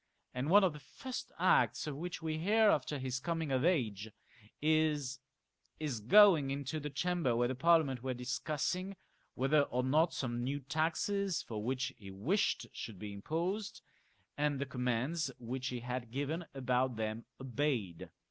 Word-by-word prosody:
" - - -46
and 130 +4 -2
one 205 +3 +7
of 180 -5 +3
the 150 - -9
first 255 - -7
acts - - +3
of 150 -2 -4
which 170 +2 -5
we 155 -1 -2
hear 210 +4 +4
after 145 +1 0
his 130 -1 -3
coming 165 -1 -2
of 130 0 +1
age 110 - +1 0.5
is 150 -4 +1 0.6
his 145 -7 -2
going 160 - +6
into 140 +2 -3
the 150 0 -4
Chamber 165 -3 0
where 120 +1 +2
the 130 - -1
ParUament 140 -1 +3
were 130 +2 -3
discussing 155 +9 -2 0.4
whether 135 +4 +3
or 125 -3 -1
not 155 +6 +3
some 120 -2 -3
new 140 +3 -1
taxes 165 - 0
for 105 -2 -5
which 130 +3 -1
he 100 -2 -10
wished 135 - 0
should 110 -4 -7
be 105 +1 -7
imposed, 175 - -3 0.5
and 145 -1 +1
the 140 - -2
commands 130 +5 -1
which 125 +2 -4
he 125 -2 -3
had 125 0 -4
given 145 +7 -3
about 130 -1 +1
them 110 +1 -3
obeyed. 130 - -2
140 Hz, 165 wpm, -34 LUFS, 125-160 Hz, 0.6 s, one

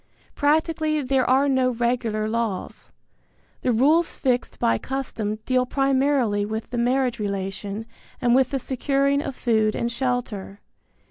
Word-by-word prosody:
Practically 310 +1 +1
there 260 -1 +1
are 270 +2 +4
no 260 -2 +2
regular 235 -3 -1
laws. 220 -4 -3 0.7
The 250 - +1
rules 300 +9 +3
fixed 250 -2 -1
by 115 0 +1
custom 245 -6 -3
deal 255 -1 +1
primarily 270 -6 +1
with 220 +2 -5
the 240 - -2
marriage 250 0 +1
relation 200 +1 -4 0.3
and 240 -1 +2
with 260 0 +4
the 275 - -1
securing 275 +2 0
of 275 - -5
food 220 -3 +1
and 235 0 -1
shelter. 235 -6 -3
250 Hz, 135 wpm, -24 LUFS, 220-270 Hz, 0.7 s, are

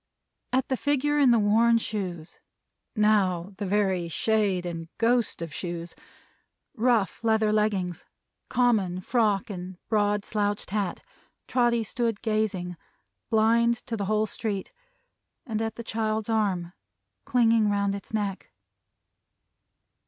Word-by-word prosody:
At 260 0 +1
the 260 - 0
figure 290 +1 +1
in 275 -3 +6
the 235 - +5
worn 225 +2 +4
shoes 185 -7 -4 0.6
now 200 -4 +2
the 205 - -3
very 190 -3 +1
shade 200 0 +1
and 165 -2 -5
ghost 230 -5 +1
of 165 -3 -7
shoes 170 0 -5 0.8
rough 235 -4 +1
leather 220 -1 +2
leggings, 200 -5 0 0.4
common 205 -8 +2
frock 210 -2 +1
and 180 -1 -7
broad 205 -1 +1
slouched 205 -2 -1
hat, 200 -3 -2 0.4
Trotty 240 -2 +2
stood 230 -1 -2
gazing, 210 -6 -1 0.5
blind 230 +2 +3
to 230 - -3
the 200 -2 -2
whole 215 +2 +1
street. 205 - -4 0.7
And 220 -4 -2
at 225 0 -2
the 235 - -7
child's 220 -1 -2
arm, 190 -6 0 0.5
clinging 230 -3 +3
round 200 -1 +1
its 200 - -8
neck. 205 -3 -3
215 Hz, 125 wpm, -26 LUFS, 190-230 Hz, 0.8 s, in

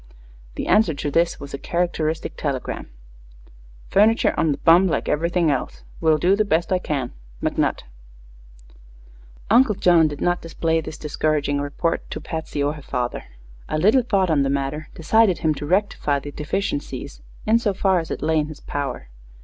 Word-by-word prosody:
The - - -3
answer 195 -8 +3
to 145 +1 -3
this 165 +3 +1
was 140 0 -9
a 140 - -4
characteristic 165 -2 -2
telegram: 140 -4 -3 1.0
Furniture 215 +3 +3
on 160 - +2
the 140 - -1
bum, 175 +3 +5
like 170 - -1
everything 170 +1 +1
else. 135 - -3 0.2
Will 160 -2 +3
do 180 +5 +3
the 215 - +2
best 170 -3 0
I 185 - +2
can. 140 -8 -3 0.3
McNutt. - - 0 1.7
Uncle 235 -2 +5
John 170 -4 +4
did 145 -1 -6
not 175 0 0
display 165 0 -1
this 155 - -8
discouraging 150 -1 -1
report 145 +4 -2
to - - -5
Patsy 160 -3 -4
or 145 +1 0
her 150 - -10
father. 125 -3 -3 0.4
A - - -1
little 215 +11 +4
thought 195 -7 +1
on 150 -3 +3
the 135 - +1
matter 140 +2 -2
decided 195 +3 +3
him 155 - +4
to 145 0 -6
rectify 185 -5 +1
the 145 +1 -7
deficiencies, 150 - -4 0.2
in 225 +2 +4
so 220 -3 0
far 190 -1 +2
as 165 - -6
it - - -4
lay 160 0 +2
in 150 - -1
his 155 -1 -9
power. 140 - -4
160 Hz, 175 wpm, -22 LUFS, 145-180 Hz, 1.7 s, bum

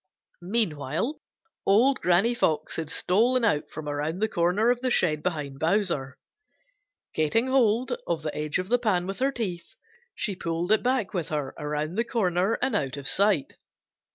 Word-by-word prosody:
Meanwhile 175 - 0 0.4
old 240 +8 +4
Granny 180 +7 +3
Fox 160 -9 0
had 160 -2 -3
stolen 235 +10 +2
out 150 -8 0
from 155 -1 -8
around 150 +3 -2
the 215 +3 +1
corner 190 +5 +2
of 245 0 -1
the 255 - 0
shed 155 -10 +1
behind 150 -6 -3
Bowser. 160 -7 0 1.0
Getting 155 +10 +1
hold 250 -1 +2
of 165 -2 -1
the 155 - -4
edge 150 0 -1
of 185 +1 -4
the 245 +1 +3
pan 195 -7 +1
with 195 +3 -5
her 270 +2 +2
teeth 185 -9 -5 0.4
she 200 - -2
pulled 170 +2 -2
it 215 - +4
back 250 -4 0
with 175 -5 -2
her 145 -3 -3
around 150 +3 -3
the - - +3
corner 195 -3 0
and 250 - +1
out 140 -5 -1
of 140 -1 -5
sight. 195 -7 +2
180 Hz, 170 wpm, -26 LUFS, 155-230 Hz, 1.0 s, old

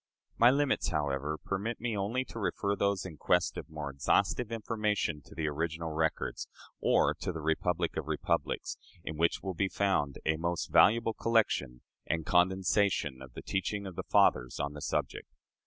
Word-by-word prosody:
My 120 - +8
limits, 140 +1 +2
however, 75 -1 -1
permit 105 +4 -2
me 115 -1 -2
only 110 +6 -1
to 115 - -8
refer 100 -1 0
those 100 -1 0
in 85 -5 -8
quest 90 +3 +2
of - - -7
more 75 -2 -5
exhaustive 105 - +1
information 105 -8 -1
to - - -14
the 80 -1 -1
original 80 +2 -2
records, 80 0 -1 0.3
or - - +3
to - - -2
the 80 - -6
"Republic 80 +2 0
of - - -3
Republics," - - -1 0.3
in 80 - -5
which 85 +2 +1
will 95 -1 -2
be 95 +3 0
found 95 -10 0
a 80 0 +2
most 85 +1 -2
valuable 115 +2 +5
collection 110 - +1 0.3
and 80 -1 -1
condensation 90 -5 +2
of 65 -2 -11
the - - -7
teaching 100 +1 -2
of 95 -2 -7
the - - -3
fathers 60 -1 +3
on 70 0 -2
the 75 - -8
subject. 75 -3 -2
90 Hz, 170 wpm, -31 LUFS, 75-100 Hz, 0.3 s, My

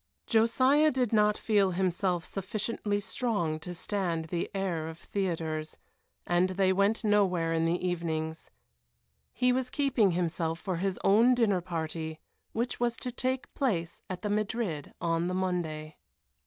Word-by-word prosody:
Josiah 255 +7 +4
did 250 -5 0
not 210 -1 +4
feel 200 -4 +2
himself 180 -1 0
sufficiently 205 +1 -2
strong 200 -8 -1
to 170 +3 -7
stand 175 -3 -1
the 170 +1 -3
air 185 -5 -2
of 160 0 -7
theatres, 165 -5 -3 0.5
and 175 +1 +2
they 190 0 +2
went 200 +4 +2
nowhere 185 -6 +2
in 165 0 +1
the 175 +2 0
evenings. 160 -2 -3 0.8
He 250 0 +2
was 255 0 0
keeping 270 -6 +2
himself 165 -1 -1
for 180 +2 -3
his 190 +1 -1
own 230 +6 +5
dinner 205 -7 +2
party, 160 -2 -4 0.3
which 235 +2 -2
was 240 -1 0
to 250 - -4
take 255 +2 -2
place 180 - -1
at 180 -1 -5
the 210 - -1
Madrid 205 -7 -2
on 165 0 0
the 180 - -1
Monday. 160 -5 -2
185 Hz, 145 wpm, -30 LUFS, 165-220 Hz, 0.8 s, own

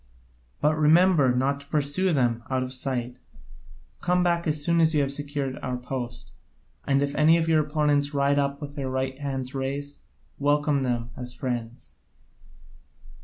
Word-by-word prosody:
But 155 +1 +2
remember 155 -2 +5
not 135 +3 0
to 140 - -14
pursue 150 +5 +1
them 120 -6 +1
out 130 -1 0
of 130 0 -6
sight, 125 -2 -3 0.8
come 180 0 +2
back 170 -1 +1
as 150 -1 0
soon 170 +1 +2
as 160 0 +3
you 150 - +3
have 140 0 -1
secured 145 -2 -3
our 125 -1 -3
post. 125 -1 -6 0.6
And 140 0 +3
if 140 0 -2
any 155 +3 +5
of 165 -1 0
your 160 -1 +4
opponents 145 -1 +1
ride 140 0 +2
up 140 0 -1
with 145 -1 -7
their 135 -3 -3
right 130 +1 -2
hands 135 -2 -3
raised, 140 +2 -4 0.4
welcome 145 0 +2
them 120 -2 -2
as 125 -1 -6
friends." 120 -2 -5
140 Hz, 165 wpm, -26 LUFS, 130-150 Hz, 0.8 s, remember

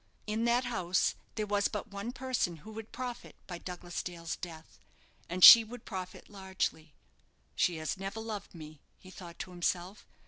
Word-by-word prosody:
In 220 +2 -1
that 240 +2 +2
house 185 -7 +1 0.2
there 215 - -1
was 205 -1 +1
but 210 -2 -6
one 200 +4 -4
person 255 -10 -2
who 220 - -9
would 220 0 -9
profit 250 -1 -6
by 175 -2 -7
Douglas 175 -1 -5
Dale's 170 -2 -5
death, 165 -2 -10 0.5
and 180 +1 -1
she 230 -1 +13
would 230 +2 -10
profit 185 -3 -7
largely. 190 -6 -4 0.6
"She 175 - +2
has 155 +4 -3
never 195 +3 -5
loved 220 -4 -6
me," 155 -2 -10 0.2
he 185 - -14
thought 175 -2 -11
to 185 - -6
himself. 180 +2 -2
190 Hz, 170 wpm, -31 LUFS, 175-220 Hz, 0.6 s, she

